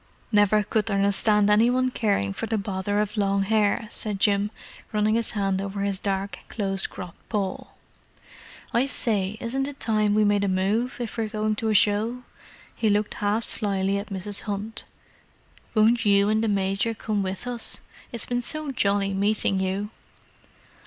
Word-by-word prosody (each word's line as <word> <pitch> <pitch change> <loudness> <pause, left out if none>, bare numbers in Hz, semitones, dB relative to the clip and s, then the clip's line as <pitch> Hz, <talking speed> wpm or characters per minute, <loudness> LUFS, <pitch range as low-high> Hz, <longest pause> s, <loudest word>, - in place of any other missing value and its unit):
"Never 210 0 +4
could 215 +2 -1
understand 200 +1 +3
any 220 +3 +5
one 255 +1 +1
caring 200 - 0
for 225 - -4
the 220 0 0
bother 200 0 -2
of 210 +1 -2
long 200 -1 +2
hair," 215 +1 +1
said 210 -3 0
Jim, 200 0 +2 0.4
running 215 0 +2
his 230 0 +1
hand 195 -1 0
over 200 0 -4
his 200 -1 -1
dark, 195 0 -2
close 195 -3 0
cropped 180 -3 -11
poll. 200 -4 -3 1.0
"I 245 +4 +2
say, 210 -6 -1
isn't 270 +4 -2
it 285 -1 -9
time 215 -2 +1
we 215 - +4
made 205 -1 +2
a - - +1
move, 200 +6 0
if 235 -1 -5
we're 220 -1 -1
going 215 0 -1
to 225 - -1
a 215 - +1
show?" 215 +5 +2 0.5
He 220 - +1
looked 210 +1 +1
half 210 +2 -1
shyly 200 -2 +1
at 200 - -7
Mrs. 195 +1 -3
Hunt. 205 +2 -4 0.9
"Won't 225 +1 +4
you 200 -1 +4
and 215 +1 +2
the - - +1
Major 200 +2 0
come 210 -1 -2
with 190 +3 -4
us? 245 -2 0 0.3
It's 235 - -5
been 245 0 -1
so 310 +3 -1
jolly 200 -4 +1
meeting 200 0 +1
you." 190 +3 -2
210 Hz, 170 wpm, -25 LUFS, 200-220 Hz, 1.0 s, any